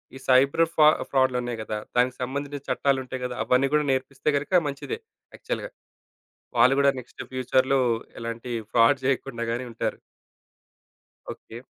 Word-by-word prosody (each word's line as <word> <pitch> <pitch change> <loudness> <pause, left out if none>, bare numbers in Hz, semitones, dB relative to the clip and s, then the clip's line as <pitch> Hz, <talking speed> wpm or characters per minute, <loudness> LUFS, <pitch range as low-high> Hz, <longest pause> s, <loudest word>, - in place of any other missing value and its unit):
ఈ - - -7
సైబర్ 135 +5 +5
ఫా 150 -1 +7 0.2
ఫ్రాడ్డులు 130 -2 +2
ఉన్నాయి 120 -1 -4
గదా! 110 0 -4 0.2
దానికి 125 +1 +2
సంబంధించి 140 +2 -3
చట్టాలుంటాయి 130 -1 0
గదా! 125 -1 -4
అవన్నీ 125 +2 +3
గూడా 150 -1 +3
నేర్పిస్తే 135 +2 -1
గనక 175 +5 +2
మంచిదే 145 - -4 0.4
యాక్చువల్‌గా. - - -4 0.9
వాళ్ళు 130 +2 +6
గూడా 140 0 +5
నెక్స్ట్ 125 - -9
ఫ్యూచర్‌లో 130 +1 +2 0.4
ఎలాంటి 115 +1 -5 0.2
ఫ్రాడ్ 125 +4 +4
జేయకుండా 130 -3 -1
గాని 120 +2 -3
ఉంటారు. 115 - -3 1.3
ఓకే. - - -11
130 Hz, 135 wpm, -25 LUFS, 125-140 Hz, 1.3 s, ఫా